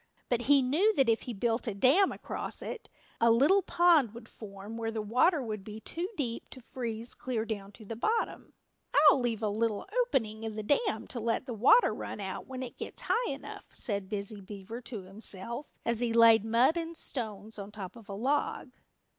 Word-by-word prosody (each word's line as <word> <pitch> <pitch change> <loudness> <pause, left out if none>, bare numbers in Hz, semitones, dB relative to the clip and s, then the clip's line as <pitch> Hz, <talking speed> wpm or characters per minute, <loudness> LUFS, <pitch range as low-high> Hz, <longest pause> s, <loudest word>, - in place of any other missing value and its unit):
But 245 -1 +1
he 280 -2 +7
knew 355 +12 +3
that 270 - +4
if 225 - +3
he - - -1
built 230 +4 0
a 215 - -2
dam 275 - +4
across - - -5
it, 480 - -7 0.3
a 230 - +5
little 280 +13 +5
pond 335 - +4
would 235 - -10
form 205 0 -9
where 225 -1 -2
the 225 -1 -3
water 255 - +3
would 215 -4 -5
be 215 +1 -8
too 340 - -4
deep 240 -6 -3
to 260 - -11
freeze 235 -2 -4
clear 235 -4 -3
down 205 -3 -5
to 220 - -13
the 225 - -5
bottom. 445 - -1 0.6
"I'll 275 - +2
leave 235 -3 -1
a - - +2
little 215 0 -1 0.2
opening 225 - -1
in 220 -1 -4
the 215 - -4
dam 285 - +1
to 245 - -5
let 230 +2 -1
the 250 - -4
water 275 - +5
run - - -6
out 190 -2 -5
when 260 0 -5
it 250 - -9
gets - - -7
high 475 +1 +2
enough," 275 - -8
said 200 -4 -3
Busy 205 0 -4
Beaver 205 +4 -8
to 225 -5 -7
himself 205 +6 -5
as 235 -1 +1
he 240 -2 0
laid 230 -2 +7
mud 235 +8 +3
and 335 0 -3
stones 220 -3 -4
on 200 +1 -7
top 195 -2 -7
of 225 -3 -14
a 200 - -4
log. 265 +3 -1
230 Hz, 205 wpm, -30 LUFS, 215-265 Hz, 0.6 s, he